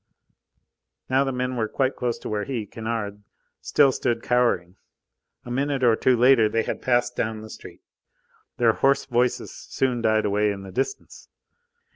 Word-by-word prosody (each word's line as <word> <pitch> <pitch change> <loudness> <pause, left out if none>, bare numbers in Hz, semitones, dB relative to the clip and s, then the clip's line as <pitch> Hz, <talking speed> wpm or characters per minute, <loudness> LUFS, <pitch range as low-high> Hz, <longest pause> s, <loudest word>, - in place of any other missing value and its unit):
Now 135 +1 +4
the 135 - -2
men 125 0 -2
were 110 -2 0
quite 130 +3 -1
close 120 -1 -2
to - - -9
where 105 -1 -1
he 120 -6 -3
Kennard 110 -2 -5 0.4
still 140 -2 +4
stood 115 -2 -2
cowering. 115 -8 +1 0.7
A 120 - -7
minute 135 +1 -1
or 115 -2 +5
two 125 +2 +2
later 120 -3 +5
they 115 +1 0
had - - -4
passed 120 -1 +1
down 110 -1 -2
the 110 - -10
street. - - -12 0.7
Their 115 -2 +4
hoarse 135 +4 +2
voices 125 -1 0
soon 125 -3 -2
died 110 -1 +2
away 105 +1 +1
in 100 -1 -6
the 95 - -9
distance. 400 - -4
120 Hz, 165 wpm, -24 LUFS, 110-130 Hz, 0.7 s, or